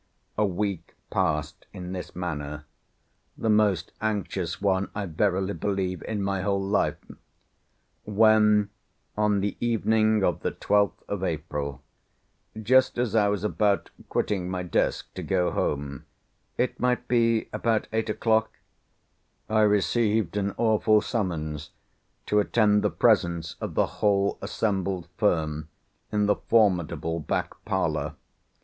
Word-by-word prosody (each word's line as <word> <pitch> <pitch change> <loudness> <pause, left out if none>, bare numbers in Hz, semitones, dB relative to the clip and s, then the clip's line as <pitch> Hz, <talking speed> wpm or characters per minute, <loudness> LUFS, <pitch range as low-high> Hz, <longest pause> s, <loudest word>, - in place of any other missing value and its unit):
A 105 0 +2
week 100 -1 -3 0.2
passed 80 -3 -1
in 90 -2 -7
this 95 -1 -6
manner, 75 -4 -4 0.7
the 110 - +1
most 105 -5 +2
anxious 100 -5 -2
one, 95 -1 +1
I 105 -1 -2
verily 95 +3 0
believe, 95 -4 -2
in 105 -3 -2
my 100 -1 -1
whole 100 +1 0
life, 95 +1 +1 1.1
when 105 -1 +4 0.4
on 105 -1 +2
the 100 +1 -1
evening 110 -2 +2
of 90 -4 +1
the - - -2
12th 105 -1 +1
of 100 -2 -3
April, 75 -4 -3 0.8
just 130 +5 +3
as 120 -3 0
I 105 -2 +4
was 100 -1 -1
about 105 -1 +1 0.2
quitting 95 -4 -1
my 90 -1 -3
desk 90 - -1
to - - -6
go 90 -2 +1
home 70 -2 -2 0.5
(it 125 - -1
might 125 0 0
be 115 -2 +2
about 115 -2 0
eight 110 0 0
o'clock) 110 0 +1 1.0
I 110 0 +3
received 105 -1 +2
an 100 -1 -1
awful 110 -1 +3
summons 80 -9 -3 0.6
to 105 - +2
attend 105 0 +3
the - - +2
presence 85 -2 +2
of - - -4
the - - +3 0.2
whole 100 -1 +2
assembled 95 -4 -2
firm 80 -7 0 0.4
in 105 -1 +2
the 105 - +2
formidable 90 -6 +1
back 75 - -2
parlour. - - -1
100 Hz, 130 wpm, -26 LUFS, 90-110 Hz, 1.1 s, when